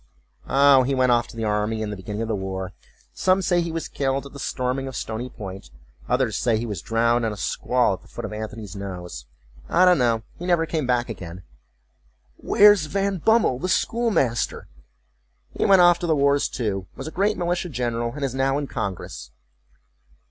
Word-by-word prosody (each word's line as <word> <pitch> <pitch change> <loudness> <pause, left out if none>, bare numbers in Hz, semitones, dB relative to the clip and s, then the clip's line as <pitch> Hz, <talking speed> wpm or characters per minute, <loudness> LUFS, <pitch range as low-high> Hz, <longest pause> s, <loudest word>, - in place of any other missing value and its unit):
"Oh, 140 -1 +6
he 135 +2 0
went 130 -1 +3
off 120 -1 +2
to 115 - -13
the 115 - -3
army 105 +1 0
in 105 - -4
the - - -4
beginning 105 +3 -5
of - - -4
the 110 - -1
war; 95 -1 -4 0.4
some 185 0 +2
say 175 0 +2
he 170 -1 -3
was 165 -1 -4
killed 135 0 -1
at 140 - -11
the 140 - -9
storming 130 0 -2
of 130 - -7
Stony 115 +3 -4
Point—others 95 - -4
say 115 -3 +1
he 115 - -3
was 105 -7 -4
drowned 115 +1 +1
in 110 - 0
a 105 - -7
squall - - +1
at - - -7
the - - -20
foot - - -7
of - - -6
Antony's 105 -2 -6
Nose. 90 -10 -7 0.4
I 180 +2 +5
don't 180 -4 +5
know—he 120 +8 -1
never 170 -2 +3
came 155 -5 -2
back 125 -1 +1
again.""Where's 85 - 0
Van 200 +2 -1
Bummel, 220 - +3
the 185 - -2
schoolmaster?""He 65 - -2
went 190 -2 +6
off 175 0 +6
to 175 - -3
the 160 - +3
wars 140 0 +3
too, 95 -6 -3
was - - -7
a - - -5
great 205 +4 +1
militia 175 0 -1
general, 120 -3 -2
and 145 -2 -2
is 130 - -3
now 135 +1 +1
in 145 - -2
congress." 100 - -5
120 Hz, 190 wpm, -23 LUFS, 105-150 Hz, 0.4 s, Oh